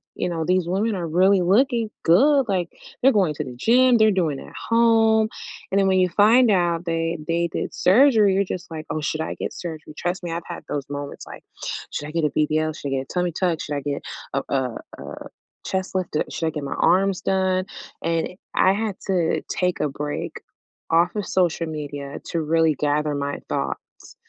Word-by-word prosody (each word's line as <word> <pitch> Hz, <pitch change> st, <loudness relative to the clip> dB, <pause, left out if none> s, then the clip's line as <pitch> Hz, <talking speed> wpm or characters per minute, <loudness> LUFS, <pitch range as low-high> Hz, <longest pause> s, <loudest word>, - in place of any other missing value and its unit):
you -, -, -2 dB
know, 165 Hz, -2 st, -2 dB
these 180 Hz, -1 st, +1 dB
women 205 Hz, +4 st, 0 dB
are 175 Hz, -3 st, -3 dB
really 185 Hz, +3 st, +4 dB
looking 230 Hz, +4 st, +2 dB
good. 275 Hz, -, +5 dB
Like, 180 Hz, -4 st, 0 dB, 0.3 s
they're 270 Hz, -, +7 dB
going 190 Hz, -, +2 dB
to -, -, -3 dB
the 125 Hz, -, -8 dB
gym, 245 Hz, -, +4 dB
they're 220 Hz, -1 st, +5 dB
doing 165 Hz, -8 st, 0 dB
it -, -, -10 dB
at -, -, -14 dB, 0.2 s
home. 225 Hz, -1 st, +4 dB, 0.4 s
And 195 Hz, -, +3 dB
then, 195 Hz, -, +3 dB
when 190 Hz, 0 st, +3 dB
you 180 Hz, -1 st, +3 dB
find 225 Hz, +6 st, +5 dB
out 175 Hz, -2 st, +1 dB
that 165 Hz, -1 st, -2 dB
they 170 Hz, 0 st, 0 dB
did -, -, -3 dB
surgery, 215 Hz, -1 st, +5 dB
you're 195 Hz, +1 st, +2 dB
just 180 Hz, -1 st, -6 dB
like, 155 Hz, -1 st, -6 dB
"Oh, 155 Hz, -, -2 dB
should 155 Hz, +1 st, -2 dB
I 160 Hz, -, -3 dB
get -, -, -4 dB
surgery?" 160 Hz, -3 st, -7 dB
Trust 180 Hz, +1 st, -2 dB
me, 170 Hz, -, -4 dB
I've 170 Hz, 0 st, -3 dB
had 175 Hz, -, -7 dB
those 140 Hz, -2 st, -2 dB
moments, 145 Hz, 0 st, -6 dB
like, -, -, -10 dB, 0.5 s
"Should 150 Hz, -, -4 dB
I -, -, -7 dB
get 165 Hz, -1 st, 0 dB
a -, -, +2 dB
BBL? 155 Hz, +1 st, +1 dB
Should 140 Hz, -, -5 dB
I -, -, -5 dB
get 135 Hz, -1 st, 0 dB
a -, -, -8 dB
tummy 180 Hz, -1 st, 0 dB
tuck? 170 Hz, -1 st, -1 dB
Should 145 Hz, -, -4 dB
I 140 Hz, -, -2 dB
get 140 Hz, 0 st, -3 dB, 0.3 s
a 135 Hz, -, +1 dB
a 130 Hz, -2 st, 0 dB, 0.3 s
a -, -, -8 dB, 0.4 s
chest 190 Hz, -1 st, -2 dB
lifted? 180 Hz, -4 st, -1 dB
Should 165 Hz, -, -1 dB
I -, -, 0 dB
get 150 Hz, -2 st, -5 dB
my 140 Hz, -, -4 dB
arms 190 Hz, +1 st, +3 dB
done?" 185 Hz, -1 st, +1 dB, 0.4 s
And 165 Hz, -1 st, 0 dB, 0.3 s
I 190 Hz, -, +5 dB
had 210 Hz, -1 st, -2 dB
to 180 Hz, -4 st, +1 dB
take 180 Hz, -1 st, 0 dB
a 150 Hz, -, +1 dB
break 145 Hz, +1 st, -5 dB, 0.5 s
off 170 Hz, +3 st, +3 dB
of 205 Hz, -, -2 dB
social 175 Hz, -2 st, +1 dB
media 145 Hz, -2 st, -6 dB
to 165 Hz, -, -2 dB
really 160 Hz, 0 st, +2 dB
gather 150 Hz, +1 st, 0 dB
my 140 Hz, 0 st, -3 dB
thoughts 70 Hz, -1 st, -5 dB
175 Hz, 210 wpm, -23 LUFS, 155-195 Hz, 0.5 s, they're